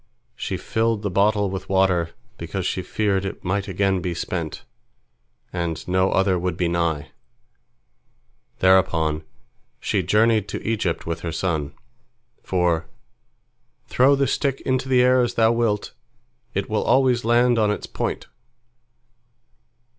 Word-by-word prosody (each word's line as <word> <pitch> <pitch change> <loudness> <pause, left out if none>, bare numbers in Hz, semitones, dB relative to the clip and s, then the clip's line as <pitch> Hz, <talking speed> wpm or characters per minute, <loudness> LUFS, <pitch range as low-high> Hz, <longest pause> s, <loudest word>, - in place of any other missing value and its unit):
She - - -3
filled 110 -1 -1
the 100 - -1
bottle 100 +1 +2
with 95 - -6
water, 95 -3 +2 0.3
because 85 +2 -4
she 95 - -1
feared 100 +1 0
it 95 +1 -6
might 95 +2 -1
again 95 -1 0
be 85 0 -3
spent, 85 -2 -4 0.9
and 85 -3 -3
no 95 +1 +2
other 95 -2 +2
would 90 +1 -2
be 90 - +1
nigh. 85 -3 -1 1.5
Thereupon 80 -5 +3 0.6
she 100 - 0
journeyed 105 +3 +2
to - - -6
Egypt 105 -7 -1
with 85 0 -3
her 85 - -4
son, 80 -4 -2 0.7
for 85 -3 0 1.0
"Throw 135 +3 +4
the 140 0 +1
stick 135 +1 -1
into 130 0 -1
the 125 -1 +5
air 125 0 +4
as 120 - -1
thou 115 0 +4
wilt, 115 -3 0 0.6
it 100 0 -1
will 110 - 0
always 130 -2 +3
land 120 +1 +3
on 105 -1 +3
its 105 - -2
point." - - -4
95 Hz, 135 wpm, -23 LUFS, 85-115 Hz, 1.5 s, the